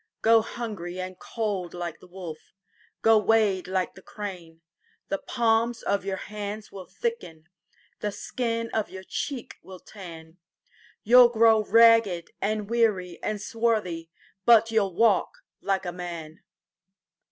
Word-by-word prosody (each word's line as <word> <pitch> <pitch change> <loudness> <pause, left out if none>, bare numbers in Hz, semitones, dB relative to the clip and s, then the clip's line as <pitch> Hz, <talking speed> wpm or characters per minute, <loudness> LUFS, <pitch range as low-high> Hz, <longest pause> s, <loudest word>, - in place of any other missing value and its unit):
Go 225 0 +6
hungry 205 -7 -6
and 185 0 -6
cold 200 -7 -3
like 175 -2 -5
the - - -16
wolf, 175 -3 -10 0.5
Go 225 -1 +6
wade 210 -3 +2
like 185 -1 -1
the 190 - -14
crane:The 175 -2 -8
palms 230 -1 +1
of 200 -1 0
your 195 -1 -3
hands 210 +1 -6
will 190 -2 -9
thicken, 175 - -5 0.5
The 210 - -2
skin 230 +1 -3
of 220 -2 -1
your 190 0 -9
cheek 260 +5 -5
will 190 -1 -11
tan, 165 -5 -11 0.7
You 245 +4 +7
'll 240 - +8
grow 225 -1 +5
ragged 225 -6 +4
and 210 0 -1
weary 210 -7 0
and 215 -1 -2
swarthy, 210 -7 -1 0.3
But 225 0 +6
you 220 -1 +4
'll 195 -3 -3
walk 220 -3 +2 0.2
like 195 -1 -1
a 175 - -2
man! 170 -3 -7
205 Hz, 140 wpm, -26 LUFS, 180-225 Hz, 0.7 s, ll